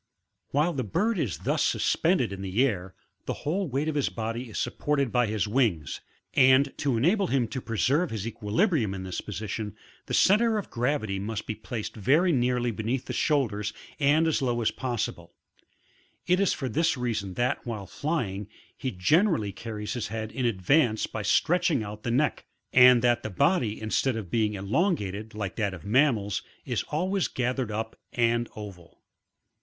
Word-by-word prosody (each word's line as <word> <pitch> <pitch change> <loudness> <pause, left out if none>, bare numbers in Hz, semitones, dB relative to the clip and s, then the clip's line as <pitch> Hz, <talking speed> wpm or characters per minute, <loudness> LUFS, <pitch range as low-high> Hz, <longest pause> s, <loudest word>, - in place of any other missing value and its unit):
While 150 +5 +1
the 130 - -2
bird 195 - 0
is 115 - -1
thus - - 0
suspended 160 - +1
in 95 - -7
the 100 +7 +2
air, 95 -7 -3 0.3
the - - -5
whole 185 +6 0
weight 140 +4 -1
of 155 - 0
his 145 -2 +1
body 115 +2 -4
is - - -7
supported 140 +1 0
by 125 -2 +2
his 105 0 -1
wings, 105 - 0 0.3
and 130 +2 +5
to 135 -5 +1
enable 185 - +2
him 130 -6 +1
to 130 - -4
preserve 135 - +1
his 110 -2 -4
equilibrium 115 - 0
in 95 - -6
this 95 -1 -4
position, 105 +1 -5 0.3
the - - 0
centre 220 +3 +4
of 205 - -5
gravity 120 -5 -1
must 105 +1 -4
be - - -3
placed 110 +1 -6
very 145 - +3
nearly 125 -3 +1
beneath 115 +4 -2
the - - -5
shoulders 115 -9 0 0.3
and 150 +3 +4
as 160 -3 +1
low 120 -3 0
as - - +2
possible; 125 -4 -4 0.9
it 180 +1 +3
is 200 - +3
for 135 - -2
this 160 +5 +1
reason 110 -6 -2
that, 120 +1 0
while 110 -5 -5
flying, 105 - -3 0.3
he 130 - -3
generally 140 - +2
carries 105 0 -5
his 120 - -3
head 110 0 -4
in 130 -2 -1
advance 115 - +2
by 110 - -5
stretching 160 - +2
out 105 +1 -7
the 115 - -3
neck, 140 +6 0 0.3
and 125 -1 +7
that 120 -1 +3
the - - -4
body, 110 - +1
instead 110 +4 0
of 100 -6 -6
being 110 -2 +1
elongated, 105 - -1
like 100 -3 -4
that 100 -4 -1
of 85 - -13
mammals, 110 -4 +2 0.2
is - - -1
always 185 +5 0
gathered 125 -1 -2
up 110 +1 -4 0.2
and 120 0 +1
oval. 100 -5 -10
120 Hz, 175 wpm, -27 LUFS, 105-145 Hz, 0.9 s, and